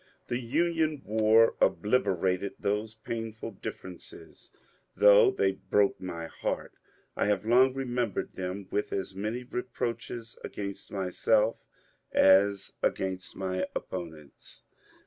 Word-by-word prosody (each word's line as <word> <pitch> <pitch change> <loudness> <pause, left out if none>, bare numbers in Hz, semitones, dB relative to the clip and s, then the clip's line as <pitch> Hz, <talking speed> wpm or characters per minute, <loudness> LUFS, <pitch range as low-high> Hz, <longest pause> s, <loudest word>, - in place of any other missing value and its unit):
The 120 - 0
Union 155 +3 0
war 110 +1 +4
obliter 105 -5 +2
ated 95 +2 -5
those 105 +2 -2
painful 115 0 -5
differences. 95 -2 -9 0.5
Though 105 0 +7
they 95 0 +1
broke 100 +1 +1
my 85 -3 -5
heart, - - -4 0.4
I - - +1
have 105 0 +1
long 130 +3 +5
remembered 125 -5 -2
them 95 +1 -5
with 105 - -1
as 95 0 -3
many 110 +6 -3
reproaches 120 -2 -5
against 100 -1 -6
myself 105 +3 +1 0.5
as 100 +1 +4
against 95 -1 -2
my 95 -1 -2
opponents. 80 -5 -8
105 Hz, 110 wpm, -29 LUFS, 95-115 Hz, 0.5 s, Though